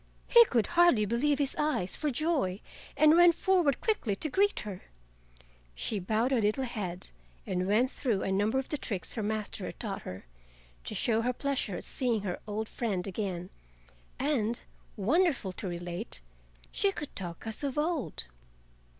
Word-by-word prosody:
He 470 Hz, -1 st, +8 dB
could 235 Hz, -, +1 dB
hardly 340 Hz, -10 st, +4 dB
believe 270 Hz, +7 st, +1 dB
his 280 Hz, -1 st, -1 dB
eyes 300 Hz, -12 st, +1 dB
for 305 Hz, -, -1 dB
joy, 270 Hz, -, 0 dB, 0.4 s
and 310 Hz, +1 st, +7 dB
ran 350 Hz, 0 st, +8 dB
forward 340 Hz, -5 st, +2 dB
quickly 335 Hz, -, 0 dB
to 310 Hz, -, -3 dB
greet 405 Hz, +5 st, +2 dB
her. 195 Hz, -3 st, -7 dB, 0.9 s
She 210 Hz, -, -2 dB
bowed 220 Hz, +7 st, 0 dB
her 250 Hz, -4 st, +3 dB
little 215 Hz, +6 st, +1 dB
head 200 Hz, -8 st, -5 dB, 0.4 s
and 185 Hz, 0 st, -1 dB
went 235 Hz, +6 st, +3 dB
through 225 Hz, -8 st, -1 dB
a 195 Hz, -, -1 dB
number 205 Hz, +6 st, +2 dB
of 265 Hz, -, -2 dB
the 300 Hz, -, -2 dB
tricks 200 Hz, -8 st, -3 dB
her 225 Hz, -, -2 dB
master 210 Hz, -1 st, -2 dB
had -, -, -7 dB
taught 200 Hz, -4 st, -3 dB
her, 90 Hz, -5 st, -8 dB, 0.6 s
to -, -, -5 dB
show 225 Hz, -1 st, +1 dB
her 250 Hz, +2 st, 0 dB
pleasure 260 Hz, -8 st, -1 dB
at -, -, -8 dB
seeing 240 Hz, -5 st, 0 dB
her 185 Hz, -3 st, -3 dB
old 215 Hz, +1 st, -3 dB
friend 205 Hz, -8 st, -2 dB
again, 190 Hz, -3 st, -4 dB, 0.7 s
and, 240 Hz, -5 st, 0 dB, 0.4 s
wonderful 265 Hz, -, +2 dB
to 190 Hz, +2 st, -6 dB
relate, 175 Hz, -, -4 dB, 0.5 s
she 400 Hz, -, +2 dB
could 295 Hz, -6 st, -7 dB
talk 175 Hz, -1 st, -5 dB
as 220 Hz, +5 st, -1 dB
of 280 Hz, 0 st, -2 dB
old. 305 Hz, -, -1 dB
230 Hz, 165 wpm, -30 LUFS, 195-290 Hz, 0.9 s, He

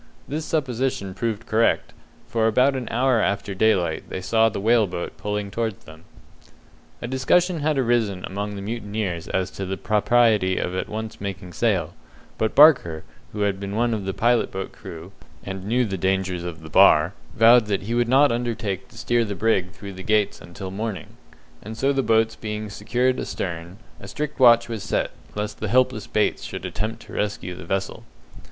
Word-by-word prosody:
This 155 Hz, +2 st, -3 dB
supposition 130 Hz, -, -1 dB
proved 115 Hz, +2 st, -3 dB
correct, 115 Hz, +1 st, +1 dB, 0.3 s
for 110 Hz, -1 st, +1 dB
about 130 Hz, +5 st, +3 dB
an 125 Hz, -3 st, -4 dB
hour 125 Hz, -1 st, +2 dB
after 100 Hz, 0 st, -1 dB
daylight 95 Hz, -5 st, +1 dB
they -, -, -4 dB
saw 110 Hz, +4 st, +3 dB
the 110 Hz, -, -5 dB
whale 110 Hz, +1 st, +3 dB
boat 90 Hz, -1 st, -5 dB
pulling 105 Hz, -1 st, -3 dB
towards 110 Hz, -1 st, -3 dB
them. 80 Hz, +1 st, -14 dB, 1.0 s
A -, -, -2 dB
discussion 170 Hz, +7 st, +2 dB
had 150 Hz, 0 st, 0 dB
arisen 115 Hz, -7 st, +1 dB
amongst 100 Hz, +2 st, -4 dB
the 100 Hz, -, -6 dB
mutineers 105 Hz, -6 st, -3 dB
as 95 Hz, -1 st, -1 dB
to 100 Hz, -, -6 dB
the 95 Hz, 0 st, -3 dB
propriety 105 Hz, -3 st, +3 dB
of 90 Hz, -, -2 dB
at 95 Hz, -, -3 dB
once 110 Hz, -1 st, -6 dB
making 95 Hz, -2 st, -6 dB
sail, 95 Hz, -8 st, 0 dB, 0.5 s
but 110 Hz, -, 0 dB
Barker, 125 Hz, -, +6 dB, 0.3 s
who 105 Hz, -, -5 dB
had 100 Hz, -2 st, 0 dB
been 100 Hz, 0 st, -5 dB
one 120 Hz, +1 st, +1 dB
of 105 Hz, -3 st, -3 dB
the 95 Hz, -, -2 dB
pilot 120 Hz, +3 st, +2 dB
boat 95 Hz, 0 st, -5 dB
crew, 85 Hz, +3 st, -10 dB, 0.3 s
and 95 Hz, -1 st, -6 dB
knew 125 Hz, +3 st, +2 dB
the 95 Hz, -4 st, -4 dB
dangers 95 Hz, -1 st, 0 dB
of 80 Hz, -2 st, -7 dB
the 80 Hz, -, -9 dB
Bar, 75 Hz, +5 st, +6 dB, 0.2 s
vowed 115 Hz, 0 st, +6 dB
that 100 Hz, -2 st, -1 dB
he 115 Hz, +4 st, -3 dB
would 120 Hz, 0 st, +1 dB
not 140 Hz, +2 st, +5 dB
undertake 115 Hz, -5 st, -2 dB
to 115 Hz, -, -17 dB
steer 120 Hz, +1 st, +1 dB
the 100 Hz, -2 st, -4 dB
brig 95 Hz, -3 st, +1 dB
through 100 Hz, +1 st, -10 dB
the 95 Hz, -, -9 dB
Gates 105 Hz, +1 st, +1 dB
until 95 Hz, +2 st, -8 dB
morning; 105 Hz, 0 st, -4 dB, 0.5 s
and 110 Hz, +2 st, -8 dB
so 135 Hz, +3 st, +2 dB
the 135 Hz, -, +1 dB
boats 115 Hz, -1 st, +2 dB
being 105 Hz, -1 st, -5 dB
secured 125 Hz, +5 st, 0 dB
astern, 85 Hz, +1 st, -5 dB, 0.2 s
a 100 Hz, -, -10 dB
strict 145 Hz, +9 st, -5 dB
watch 120 Hz, -2 st, +6 dB
was 115 Hz, -3 st, -5 dB
set, -, -, -1 dB, 0.2 s
lest 105 Hz, 0 st, -4 dB
the 110 Hz, -, -2 dB
helpless 120 Hz, -2 st, +2 dB
Bates 105 Hz, -, 0 dB
should 95 Hz, -1 st, -6 dB
attempt 105 Hz, +5 st, -4 dB
to -, -, -13 dB
rescue 105 Hz, -3 st, -2 dB
the 90 Hz, -, -10 dB
vessel. 95 Hz, +2 st, -3 dB
105 Hz, 185 wpm, -23 LUFS, 95-120 Hz, 1.0 s, Barker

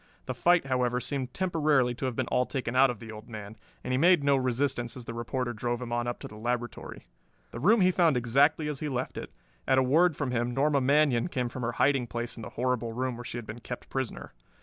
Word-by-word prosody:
The -, -, -3 dB
fight, 175 Hz, -3 st, +3 dB
however, 125 Hz, -2 st, 0 dB
seemed 130 Hz, -1 st, -3 dB
temporarily 150 Hz, -8 st, +1 dB
to 125 Hz, -, -4 dB
have 130 Hz, -2 st, -2 dB
been -, -, 0 dB
all 125 Hz, -, +1 dB
taken 130 Hz, -3 st, -3 dB
out 135 Hz, +1 st, +6 dB
of 120 Hz, -, -3 dB
the 115 Hz, -1 st, -9 dB
old 110 Hz, +2 st, -11 dB
man, 105 Hz, -1 st, -8 dB, 0.3 s
and 125 Hz, -, -4 dB
he 130 Hz, -, +2 dB
made 175 Hz, -1 st, +5 dB
no 140 Hz, 0 st, +4 dB
resistance 130 Hz, -1 st, -1 dB
as 125 Hz, -, -9 dB
the 115 Hz, -, -6 dB
reporter 120 Hz, +1 st, -3 dB
drove 120 Hz, +2 st, -2 dB
him 125 Hz, -2 st, -6 dB
on 120 Hz, 0 st, -1 dB
up 120 Hz, -, -2 dB
to -, -, -6 dB
the 105 Hz, -, -12 dB
laboratory. 120 Hz, +2 st, -4 dB, 0.5 s
The 115 Hz, -, -6 dB
room 210 Hz, -, +4 dB
he 185 Hz, 0 st, +5 dB
found 170 Hz, -6 st, +3 dB
exactly 140 Hz, +6 st, +3 dB
as 150 Hz, -2 st, -3 dB
he 150 Hz, -, -3 dB
left 130 Hz, -1 st, -3 dB
it. -, -, -7 dB, 0.4 s
At 130 Hz, -, +4 dB
a 130 Hz, -, +5 dB
word 160 Hz, +6 st, +4 dB
from 140 Hz, -3 st, -2 dB
him 120 Hz, 0 st, -1 dB
Norma 140 Hz, 0 st, +2 dB
Manion 140 Hz, -2 st, +3 dB
came 125 Hz, -8 st, -2 dB
from 130 Hz, -, -7 dB
her 120 Hz, 0 st, -2 dB
hiding 135 Hz, -2 st, +2 dB
place 120 Hz, +2 st, -4 dB
in 115 Hz, -, -9 dB
the -, -, -7 dB
horrible 125 Hz, -2 st, -1 dB
room 130 Hz, +1 st, -2 dB
where 120 Hz, -, -8 dB
she 120 Hz, -, -6 dB
had 120 Hz, -, -6 dB
been 110 Hz, +3 st, -8 dB
kept 125 Hz, +1 st, -8 dB
prisoner. 130 Hz, -3 st, -4 dB
125 Hz, 250 wpm, -28 LUFS, 120-140 Hz, 0.5 s, out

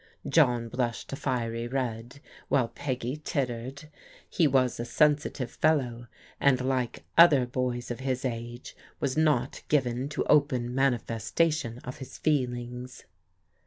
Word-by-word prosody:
John 125 Hz, -7 st, +3 dB
blushed 120 Hz, +2 st, -3 dB
a -, -, -1 dB
fiery 120 Hz, -5 st, -2 dB
red, 125 Hz, 0 st, -4 dB, 0.3 s
while 125 Hz, -4 st, +2 dB
Peggy 130 Hz, 0 st, -3 dB
tittered. 130 Hz, +2 st, -3 dB, 0.4 s
He 165 Hz, -, +2 dB
was 130 Hz, -3 st, +2 dB
a -, -, -1 dB
sensitive 150 Hz, -1 st, +1 dB
fellow, 125 Hz, -7 st, 0 dB, 0.3 s
and 140 Hz, -2 st, +4 dB
like 130 Hz, -2 st, -1 dB, 0.2 s
other 150 Hz, -7 st, +8 dB
boys 125 Hz, -1 st, -2 dB
of 120 Hz, -, -5 dB
his 130 Hz, -1 st, -2 dB
age, 120 Hz, 0 st, -5 dB, 0.2 s
was 135 Hz, -2 st, -1 dB
not 150 Hz, -5 st, +1 dB
given 130 Hz, -2 st, +1 dB
to 150 Hz, -, -2 dB
open 130 Hz, -5 st, +2 dB
manifestation 125 Hz, +2 st, 0 dB
of 125 Hz, -, -7 dB
his 130 Hz, -1 st, -9 dB
feelings. 125 Hz, -3 st, -2 dB
125 Hz, 125 wpm, -28 LUFS, 120-140 Hz, 0.4 s, other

